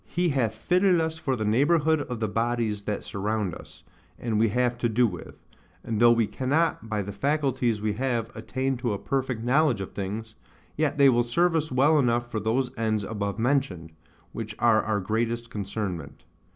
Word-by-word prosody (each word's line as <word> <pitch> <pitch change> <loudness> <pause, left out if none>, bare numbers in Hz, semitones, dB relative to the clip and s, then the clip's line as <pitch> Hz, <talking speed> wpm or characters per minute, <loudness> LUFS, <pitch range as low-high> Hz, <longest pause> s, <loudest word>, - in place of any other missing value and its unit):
He 175 0 0
hath 120 -7 0
fitted 180 - +3
us 160 0 -1
for 135 -4 -1
the 110 -3 -3
neighbourhood 150 +7 +3
of 125 -5 -5
the 110 - 0
bodies 115 -1 -1
that 105 - -2
surround 105 -2 -2
us, 80 - -12 0.3
and 110 -3 -1
we 115 0 +3
have 125 +2 +1
to 120 - +1
do 120 +3 +3
with; 90 -6 -6 0.5
and 110 -2 -2
though 120 0 +7
we 115 -1 +3
cannot, 135 0 0
by 105 -2 -1
the 100 +1 -6
faculties 130 -2 0
we 105 -1 0
have, 120 -1 -2
attain 130 +4 -2
to 120 -3 -1
a - - -2
perfect 130 -1 -2
knowledge 130 -1 +3
of 95 - -5
things, 105 +3 -5 0.4
yet 150 -1 0
they 140 -1 +6
will 120 -2 +3
serve 170 +8 +1
us 155 -2 0
well 145 +4 +4
enough 120 -2 +1
for 110 - -1
those 120 +4 0
ends 110 -2 0
above 100 -2 -3
mentioned, 110 - 0 0.4
which 110 -2 -6
are 115 -2 +4
our 110 -2 -1
great 110 +4 0 0.2
concernment. 95 -7 -5
115 Hz, 190 wpm, -26 LUFS, 105-135 Hz, 0.5 s, though